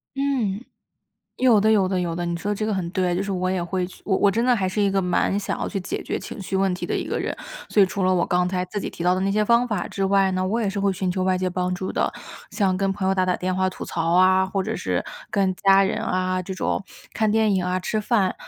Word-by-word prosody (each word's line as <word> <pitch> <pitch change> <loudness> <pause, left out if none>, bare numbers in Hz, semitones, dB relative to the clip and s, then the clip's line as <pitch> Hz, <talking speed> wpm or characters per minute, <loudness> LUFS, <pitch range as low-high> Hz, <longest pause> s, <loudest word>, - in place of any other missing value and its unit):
嗯。 255 -7 -1 0.7
有 245 -4 +5
的， 215 +2 +3
有 210 -3 +4
的， 185 0 0
有 170 -2 -2
的， 175 0 -2
你 170 - -2
说 205 +4 -2
这 215 - -2
个 215 - 0
很 185 -3 -2
对。 185 -2 0
就 180 - 0
是 195 - -4
我 185 -1 -1
也 185 -1 -1
会 180 +1 -2
去 180 - -14
我 195 - +2
我 200 - +4
真 230 +4 0
的 250 -1 +4
还 190 -4 0
是 205 +3 -1
一 200 - +3
个 195 0 +1
蛮 180 +2 +1
想 205 - -3
要 - - -2
去 200 - -4
解 185 - -4
决 - - -3
情 - - -8
绪 190 +1 -4
问 190 -1 +2
题 180 - -4
的 - - -2
一 - - -2
个 - - -2
人。 - - -3 0.3
所 205 - +4
以 - - +5
除 190 0 -2
了 185 - +3
我 175 - +2
刚 180 0 +1
才 180 0 -1
自 205 +3 -4
己 - - -4
提 - - -7
到 180 +1 +4
的 185 - -1
那 195 +1 0
些 210 +2 +2
方 235 +3 +3
法 210 -7 -2
之 195 - -2
外 195 -1 +3
呢， 185 0 -1
我 225 +5 0
也 210 - 0
是 200 +1 -3
会 195 -1 +1
寻 185 0 -1
求 185 0 -1
外 185 0 +2
界 185 0 -1
帮 180 0 -1
助 185 +1 -4
的。 - - 0 0.4
像 190 -4 +1
跟 195 0 0
朋 195 -1 -3
友 190 - +3
打 185 -1 +1
打 180 -1 +1
电 185 0 -2
话 185 0 +1
吐 - - -8
槽 165 0 -2
啊， 185 +1 +5
或 190 0 -2
者 - - -3
是 - - -1 0.3
跟 195 -2 +1
家 195 +1 +5
人 195 - -1
啊， 185 0 -1
这 190 +1 -6
种 - - -1 0.3
看 220 -1 +1
电 220 -1 +3
影 185 -2 0
啊、 180 0 -1
吃 215 - -1
饭， 210 -3 +1
190 Hz, 315 characters per minute, -23 LUFS, 185-200 Hz, 0.7 s, 有